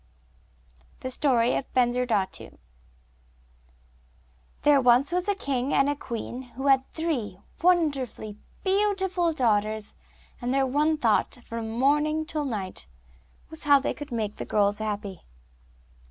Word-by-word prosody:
] 60 +1 -31
The 255 - -4
Story 250 -3 +2
of - - -4
Bensurdatu 240 -5 0 2.1
There 290 -2 +5
was 250 +5 +4
once 360 +1 0
a 405 - +2
king 275 -7 -1
and 275 - +4
a 290 - +1
queen 245 -1 -5 0.2
who 265 - -4
had 270 -1 +3
three 260 - -2 0.2
wonderfully 280 - +1 0.2
beautiful 380 -3 +1
daughters, 215 -6 0 0.5
and 245 +1 -1
their 270 0 +2
one 300 +4 +1
thought, 230 -5 +1
from 230 -1 -5
morning 295 +6 +1
till 310 -2 -3
night, 195 - -5 0.6
was 315 -1 -8
how 285 -1 +7
they 275 - -2
could 290 -2 -9
make 215 -3 -3
the - - -4
girls 205 0 +1
happy. 205 -3 -4
255 Hz, 130 wpm, -26 LUFS, 215-300 Hz, 2.1 s, how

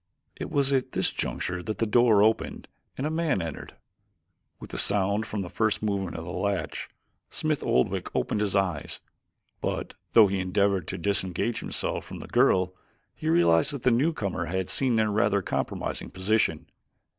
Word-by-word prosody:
It - - -6
was 140 -1 +2
at 130 -2 0
this - - +1
juncture 90 0 -3
that 110 +4 -4
the 115 - +1
door 110 -2 +5
opened 110 +1 0 0.3
and 135 - -2
a 155 - -1
man 160 -8 +1
entered. 85 -2 -6 0.8
With - - -10
the - - -2
sound 100 +2 +2
from 105 -2 -3
the - - -6
first 110 +1 0
movement 100 -4 -1
of 80 - -5
the 85 - -6
latch, 100 +1 -2 0.4
Smith 155 -3 -1
Oldwick 65 +1 +1
opened 105 - 0
his 105 -2 0
eyes, 90 -7 -1 0.6
but - - -3 0.2
though 115 -2 +8
he 100 -1 0
endeavored 95 -1 +1
to - - -4
disengage 95 +4 -1
himself - - -2
from - - -9
the - - -8
girl 90 0 +3 0.4
he - - -3
realized 85 - +4
that 140 - -6
the 125 - +4
newcomer 115 - 0
had 95 +2 -2
seen 130 -3 +2
their 110 -1 +2
rather 100 -2 +2
compromising - - -3
position. 95 -4 0
100 Hz, 170 wpm, -27 LUFS, 90-115 Hz, 0.8 s, though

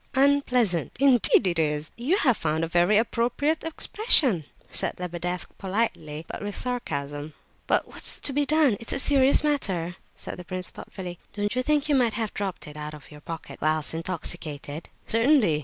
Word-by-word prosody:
"Unpleasant! 255 - +2
Indeed 265 -7 +5
it 170 -3 0
is. 150 -1 0
You 280 +11 0
have 260 - +3
found 160 -2 -1
a - - 0
very 175 +5 +3
appropriate 245 +7 0
expression," 310 - +3 0.2
said - - 0
Lebedeff, 175 0 -4
politely, 185 -7 -2
but - - -7
with 205 0 -4
sarcasm. 145 - -3 0.3
"But - - +1
what's - - -3
to 280 - +2
be 290 +2 +2
done? 295 -6 +3
It's 230 - 0
a - - 0
serious 275 0 +5
matter," 190 - -1 0.2
said - - -7
the - - -7
prince, 185 0 -3
thoughtfully. 180 -3 -8
"Don't 205 +2 -2
you 255 - +1
think 300 +2 +1
you 295 - +1
may 250 -4 +3
have 220 -1 -3
dropped 195 -6 -4
it 150 0 -10
out 150 0 -6
of 150 0 -15
your 150 0 -12
pocket 165 +1 -8
whilst 155 0 +1
intoxicated?" 160 -3 -5 0.2
"Certainly. 230 - +3
200 Hz, 175 wpm, -25 LUFS, 165-260 Hz, 0.3 s, Indeed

